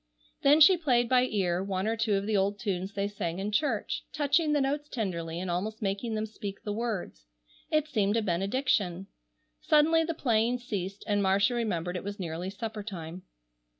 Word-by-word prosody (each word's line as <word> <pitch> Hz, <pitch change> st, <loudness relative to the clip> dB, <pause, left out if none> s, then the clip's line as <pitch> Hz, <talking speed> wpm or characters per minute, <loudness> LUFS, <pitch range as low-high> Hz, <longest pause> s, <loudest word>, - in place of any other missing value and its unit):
Then 290 Hz, +3 st, +6 dB
she 365 Hz, +4 st, +8 dB
played 250 Hz, -7 st, +2 dB
by 250 Hz, +1 st, +4 dB
ear 185 Hz, -6 st, 0 dB
one 190 Hz, -1 st, -2 dB
or 225 Hz, +1 st, +1 dB
two 225 Hz, -2 st, +1 dB
of 195 Hz, 0 st, -1 dB
the 215 Hz, 0 st, 0 dB
old 200 Hz, +1 st, +1 dB
tunes 195 Hz, -3 st, -3 dB
they 200 Hz, 0 st, -1 dB
sang 175 Hz, -4 st, -4 dB
in 200 Hz, +2 st, -3 dB
church, 225 Hz, -1 st, 0 dB
touching 300 Hz, +1 st, +2 dB
the 295 Hz, -, +3 dB
notes 290 Hz, +2 st, -1 dB
tenderly 170 Hz, -7 st, -3 dB
and 180 Hz, 0 st, -3 dB
almost 210 Hz, +5 st, -2 dB
making 205 Hz, +3 st, -2 dB
them 215 Hz, 0 st, -1 dB
speak 205 Hz, -2 st, -7 dB
the 205 Hz, -, -3 dB
words. 205 Hz, -, -4 dB, 0.4 s
It 310 Hz, -1 st, +1 dB
seemed 215 Hz, -6 st, +1 dB
a 225 Hz, -, +1 dB
benediction. 195 Hz, -1 st, 0 dB, 0.6 s
Suddenly 320 Hz, +2 st, +4 dB
the 335 Hz, 0 st, -3 dB
playing 235 Hz, -3 st, +1 dB
ceased 200 Hz, -5 st, -5 dB
and 205 Hz, -1 st, +1 dB
Marcia 200 Hz, +4 st, +3 dB
remembered 180 Hz, -7 st, -2 dB
it 180 Hz, -, -4 dB
was 205 Hz, +1 st, -6 dB
nearly 175 Hz, +1 st, -4 dB
supper 215 Hz, +2 st, -5 dB
time. 180 Hz, -4 st, -7 dB
205 Hz, 185 wpm, -29 LUFS, 190-245 Hz, 0.6 s, she